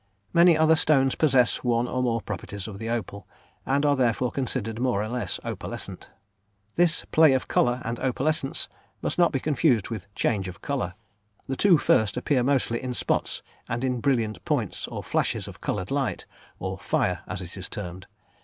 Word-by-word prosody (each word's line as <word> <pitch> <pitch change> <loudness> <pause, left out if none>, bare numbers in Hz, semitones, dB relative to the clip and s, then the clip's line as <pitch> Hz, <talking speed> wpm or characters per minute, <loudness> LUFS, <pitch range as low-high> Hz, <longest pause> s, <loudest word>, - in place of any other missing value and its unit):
Many 170 -1 +6
other 160 0 +5
stones 135 -4 +3
possess 130 -6 +3
one 120 -1 +1
or 130 - -1
more 115 -3 0
properties 100 -1 -5
of 100 -2 -8
the 115 - -4
opal, 100 -4 -4 0.4
and 140 +2 +2
are 145 -1 +4
therefore 125 -1 +1
considered 120 -4 -3
more 125 -6 +1
or - - -3
less 120 -5 -3
opalescent. - - -6 0.6
This 175 0 +2
"play 155 -3 +6
of 130 - 0
colour" 120 +1 +2
and 115 +1 -3
"opalescence," 135 +2 -1 0.4
must - - -1
not 175 - +5
be 135 - 0
confused 135 -6 +2
with 105 -3 -5
"change 100 -4 0
of 90 +1 -8
colour." 125 -11 -3 0.5
The 135 - -3
two 185 +2 +5
first 110 -6 +2
appear 130 +1 +1
mostly 125 -3 +1
in 125 -1 -3
spots - - -1 0.3
and 120 +2 -2
in 125 -2 0
brilliant 110 - 0
points - - -1
or - - -6
flashes - - 0
of - - -11
coloured 90 +5 -3
light, 135 -4 -1 0.3
or - - -4
"fire" - - 0
as - - -4
it - - -8
is - - -6
termed. 90 -1 -6
125 Hz, 180 wpm, -26 LUFS, 110-140 Hz, 0.6 s, Many